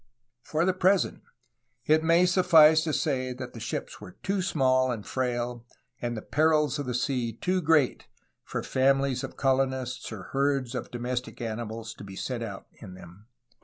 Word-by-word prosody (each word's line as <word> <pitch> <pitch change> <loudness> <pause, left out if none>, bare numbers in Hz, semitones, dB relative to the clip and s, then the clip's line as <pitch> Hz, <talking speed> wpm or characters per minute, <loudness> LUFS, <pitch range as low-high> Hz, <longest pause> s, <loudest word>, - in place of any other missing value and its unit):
For 155 +6 -1
the 185 - +2
present 185 +1 +2 0.6
it 155 +1 +3
may 165 +2 +4
suffice 165 -4 +6
to 160 - 0
say 130 -5 -1
that 125 0 -8
the 115 - -8
ships 115 - -5
were 90 - -10
too 195 0 0
small 130 -7 +2
and 110 -4 -5
frail 120 -2 -2 0.4
and 120 -1 -3
the 110 - -6
perils 150 -2 +2
of 145 - -4
the 125 - -2
sea 125 -2 -1
too 185 - -1
great 155 -5 +2 0.4
for - - -4
famihes 135 -1 +1
of - - -7
colon 135 0 +2
ists 130 -2 -5
or 105 -4 -7
herds 135 -2 0
of 125 - -4
domestic 125 +1 -4
animals 115 -1 -5
to - - -12
be 95 -1 -9
sent 125 +3 -4
out 105 -4 -6
in 95 -4 -10
them. 90 +4 -14
130 Hz, 175 wpm, -27 LUFS, 120-155 Hz, 0.6 s, suffice